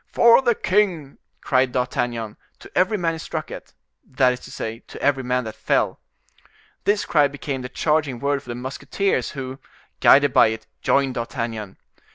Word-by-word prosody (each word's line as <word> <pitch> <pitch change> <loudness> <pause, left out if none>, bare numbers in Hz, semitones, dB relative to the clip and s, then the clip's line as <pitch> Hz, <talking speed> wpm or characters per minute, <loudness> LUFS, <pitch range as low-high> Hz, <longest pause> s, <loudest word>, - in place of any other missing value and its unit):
"For 235 +2 +6
the 240 -3 +2
king!" 180 -10 0 0.2
cried 130 -2 +2
D'Artagnan, 120 -3 -2 0.2
to - - -15
every 190 +4 +2
man 170 -3 0
he - - -5
struck 160 -1 -5
at, - - -10 0.3
that 130 -1 +2
is 125 - -7
to - - -12
say, 115 +1 -5
to - - -10
every 140 -2 +1
man 125 0 0
that 110 -1 -6
fell. - - 0 0.9
This 205 0 +2
cry 150 -3 +4
became 140 -1 -5
the 125 - -6
charging 150 -3 0
word 140 +3 -1
for 125 - -16
the 120 - -4
musketeers, 130 +5 -2
who, 130 0 -6 0.4
guided 145 -1 +6
by - - +6
it, 110 0 -4 0.2
joined 135 -2 +2
D'Artagnan. 115 -4 -4
135 Hz, 175 wpm, -22 LUFS, 125-155 Hz, 0.9 s, For